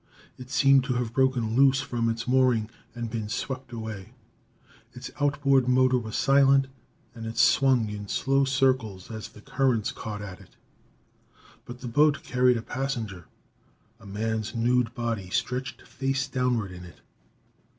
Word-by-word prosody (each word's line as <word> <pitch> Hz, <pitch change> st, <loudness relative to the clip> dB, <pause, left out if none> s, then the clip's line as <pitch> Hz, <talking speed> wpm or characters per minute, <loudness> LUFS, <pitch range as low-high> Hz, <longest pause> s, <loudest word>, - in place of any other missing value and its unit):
It 125 Hz, 0 st, -11 dB
seemed 135 Hz, 0 st, +4 dB
to 125 Hz, -2 st, -1 dB
have 120 Hz, -2 st, -2 dB
broken 125 Hz, -4 st, +1 dB
loose 135 Hz, 0 st, +5 dB
from 115 Hz, -3 st, -1 dB
its 115 Hz, +1 st, -3 dB
mooring 125 Hz, -4 st, +2 dB, 0.2 s
and 120 Hz, -1 st, -4 dB
been 110 Hz, -2 st, -4 dB
swept 130 Hz, +2 st, -4 dB
away; 110 Hz, -2 st, -7 dB, 0.8 s
its 125 Hz, 0 st, -8 dB
outboard 140 Hz, -2 st, +2 dB
motor 130 Hz, 0 st, +3 dB
was 110 Hz, -2 st, -7 dB
silent 135 Hz, 0 st, +4 dB, 0.5 s
and 115 Hz, -2 st, -7 dB
it 115 Hz, -, -7 dB
swung 130 Hz, -2 st, +4 dB
in 105 Hz, -1 st, -6 dB
slow 135 Hz, +6 st, +1 dB
circles 130 Hz, -8 st, 0 dB
as 110 Hz, -1 st, -7 dB
the 105 Hz, -, -16 dB
currents 125 Hz, -3 st, 0 dB
caught 105 Hz, -2 st, -6 dB
at 95 Hz, -2 st, -9 dB
it. -, -, -19 dB, 1.1 s
But 120 Hz, +1 st, -10 dB
the 125 Hz, -, -6 dB
boat 145 Hz, +4 st, +3 dB
carried 125 Hz, -1 st, +2 dB
a 115 Hz, -, -5 dB
passenger. 115 Hz, -10 st, -4 dB, 0.7 s
A 110 Hz, -, -14 dB
man's 110 Hz, +2 st, -3 dB
nude 120 Hz, 0 st, +1 dB
body 115 Hz, -6 st, -3 dB
stretched 130 Hz, +7 st, -3 dB
face 135 Hz, 0 st, -2 dB
downward 125 Hz, -6 st, -1 dB
in 90 Hz, 0 st, -10 dB
it. 85 Hz, -4 st, -14 dB
125 Hz, 150 wpm, -26 LUFS, 110-130 Hz, 1.1 s, loose